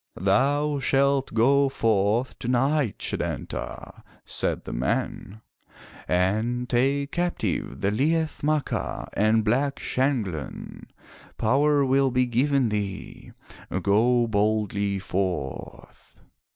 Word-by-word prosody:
"Thou 140 - +2
Shalt 135 0 +1
go 135 +5 +3
forth 110 0 0
tonight, 130 0 +1
Setanta," - - -5 0.2
said - - -2
the - - -6
man, 95 - -3 0.7
"and 110 +7 0
take 135 +4 +1
captive 110 - -2
the 100 - +1
Liath 155 +7 0
Macha 150 -1 -1
and 110 +2 +2
Black 135 +6 +1
Shanghlan. 115 - -3 0.5
Power 140 +5 +3
will 135 +1 +3
be 125 0 +2
given 130 +1 +1
thee. 100 -2 -5 0.5
Go 120 +4 +3
boldly 105 -2 0
forth." 90 -8 -5
120 Hz, 95 wpm, -25 LUFS, 105-140 Hz, 0.7 s, go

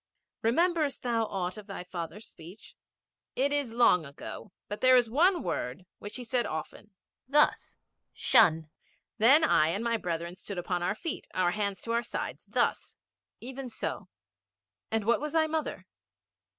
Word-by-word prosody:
'Rememberest 310 +4 +1
thou 230 -2 +1
aught 185 -2 -3
of 210 - -13
thy 195 -3 -6
father's 180 +4 -7
speech?' 175 +7 -13 0.6
'It 280 +2 +1
is 285 -5 0
long 225 -7 +4
ago. 140 +6 -9 0.2
But 205 - -6
there 255 0 +7
is 240 -3 +2
one 345 +6 +3
word 135 +9 -3
which 205 +1 -8
he 250 - -5
said 240 +1 0
often. 160 +6 -6 0.4
Thus 295 +3 +2 0.3
"Shun." 160 - +4 0.5
Then 270 +9 +7
I 155 - +4
and 195 +7 -1
my 230 -1 +1
brethren 170 -2 -4
stood 195 0 -7
upon 175 0 -2
our 205 +4 0
feet, 315 +7 -5
our 180 -1 +2
hands 200 -1 -2
to 230 - -4
our 235 0 +2
sides. - - -5
Thus.' - - -1 0.4
'Even 260 +1 -7
so. - - -5 0.8
And 220 -2 -1
what 235 +4 +2
was 300 +1 -4
thy 320 -1 +4
mother?' 315 0 -3
225 Hz, 160 wpm, -29 LUFS, 180-260 Hz, 0.8 s, there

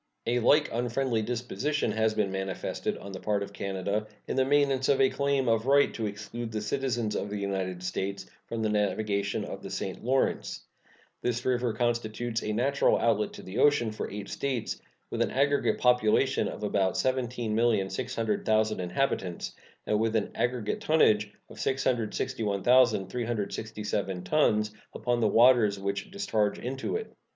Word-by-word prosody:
A 120 +1 +1
like 145 +6 +4
unfriendly 120 0 0
disposition 125 +4 -1
has 110 0 +1
been 105 -3 +1
manifested 95 0 -3
on 100 - -9
the 95 - -6
part 105 0 0
of 100 0 -9
Canada 100 +2 -2 0.2
in - - -2
the 130 - +4
maintenance 135 -1 +2
of 140 - +4
a 135 -1 +4
claim 140 -2 +1
of 115 +1 +2
right 140 +1 +4
to 110 -2 -2
exclude 110 +3 -6
the 110 - -2
citizens 120 -4 -1
of 100 - -2
the 105 - -3
United 95 -2 -3
States 95 +1 -3 0.2
from 115 -1 -3
the 110 - +1
navigation 100 -1 0
of - - -7
the - - -7
St. - - -4
Lawrence. 130 +3 0 0.6
This 120 -1 -1
river 125 -2 +1
constitutes 120 0 -1
a 105 - -2
natural 135 +6 +2
outlet 105 -3 +1
to - - -10
the 95 +4 -5
ocean 145 -6 +4
for 110 - -5
eight 100 0 -6
States, 130 -4 -3 0.3
with - - -2
an - - +2
aggregate 140 +2 +2
population 125 +2 +3
of - - -6
about 100 -2 +1
17,600,000 115 -3 0
inhabitants, 90 -1 -2 0.3
and 105 - +1
with 115 0 +1
an 110 - 0
aggregate 120 -3 -1
tonnage 105 -10 +3 0.2
of 110 - -13
661,367 110 -4 0
tons 105 -2 +2 0.2
upon 120 -1 0
the 110 - +3
waters 115 -3 +5
which 100 0 -3
discharge 115 - 0
into 130 - -3
it. 440 0 -5
110 Hz, 155 wpm, -28 LUFS, 105-125 Hz, 0.6 s, waters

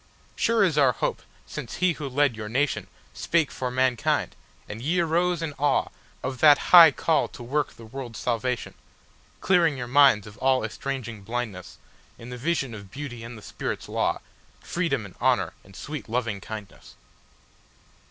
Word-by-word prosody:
Sure 230 -2 +2
is 160 -6 +2
our 135 -3 +5
hope - - -2 0.2
since 130 -6 -7
he 185 -1 +2
who 150 -3 -6
led 140 -2 +2
your 105 -1 -6
nationSpake 145 +4 -1
for 125 - -3
mankind, 125 -1 0 0.3
and 105 +2 -7
ye 165 +7 0
arose 170 +1 +1
in 155 -2 -3
aweOf 145 +1 +1 0.5
that 150 -2 +7 0.2
high 170 -2 +11
call 160 +3 +1
to 120 - -11
work 145 +5 -1
the 115 - -12
world's 120 0 -7
salvation; 125 +1 -2 0.7
Clearing 170 -6 +3
your 125 - -4
minds 130 -5 +5
of 105 0 -13
all 130 -2 +2
estranging 115 -2 -5
blindnessIn 110 -5 -5 0.5
the - - -5
vision 135 -1 -1
of 100 -3 -10
Beauty 125 -2 -7
and 115 0 -8
the 105 - -13
Spirit's - - -5
law, - - -1 0.4
Freedom - - -2
and - - -11
Honour - - +2
and 95 0 -17
sweet 145 +4 -7
Lovingkindness. 110 -3 -5
130 Hz, 150 wpm, -25 LUFS, 115-150 Hz, 0.7 s, high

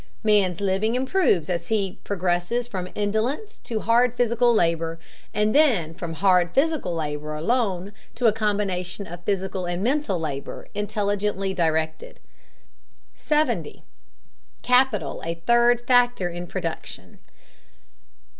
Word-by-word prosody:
Man's 200 -5 +3
living 200 +4 +1
improves 260 - +2
as 170 -2 -2
he 200 -4 -1
progresses 185 +5 -1
from 185 -5 -5
indolence 230 - -2
to 220 -2 -4
hard 240 +1 +3
physical 240 0 +3
labor, 165 -5 +1 0.3
then 215 - +3
from 170 -1 -6
hard 180 -1 +2
physical 290 - +1
labor 150 -1 -3
alone 195 +1 -1 0.2
to 245 - -2
a 220 - +6
combination 200 -3 -2
of 175 0 -9
physical 190 -2 -2
and 175 +2 -2
mental 255 - 0
labor 140 -4 -5
intelligently 205 -2 -1
directed. 160 -2 -1 1.0
70. 305 0 -1 0.8
CAPITAL 250 - +2
A 165 +1 -3
THIRD 240 +6 +3
FACTOR 245 -7 +3
IN 175 +1 -6
PRODUCTION. - - -6
200 Hz, 115 wpm, -24 LUFS, 175-235 Hz, 1.0 s, a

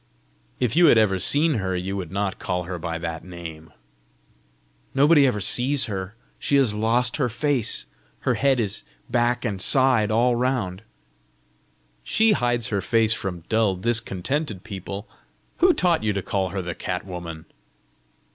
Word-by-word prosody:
"If 120 -3 0
you 170 0 +6
had 120 - +6
ever 100 -4 +3
seen 145 - +3
her, 95 -1 -2
you 95 +2 -3
would 95 -4 -5
not 100 0 -2
call 90 -1 -2
her 90 0 -6
by 85 0 -4
that 80 -1 -5
name!" 80 -3 -10 1.2
"Nobody 145 0 +5
ever 105 -5 0
sees 125 +8 +1
her: 95 0 -5 0.2
she 140 - 0
has 135 -6 +4
lost 115 +2 +1
her 130 -5 0
face! 130 0 0 0.4
Her - - +1
head 135 -2 +2
is 105 -2 -1 0.3
back 120 -1 +1
and 100 -3 -2
side 130 -4 +4
all 120 +3 +2
round." 120 -7 -1 1.2
"She 220 +1 +3
hides 120 - +1
her 100 -3 -1
face 115 0 +3
from 90 -6 -4
dull, 110 -3 +1
discontented 110 - -1
people! 100 0 -7 0.5
Who 360 +2 +5
taught 175 - +1
you 105 -1 +1
to 100 -1 -3
call 95 -2 -1
her 95 0 -4
the 85 0 -4
cat 90 +2 -4
woman?" 85 -4 -8
110 Hz, 155 wpm, -23 LUFS, 95-125 Hz, 1.2 s, you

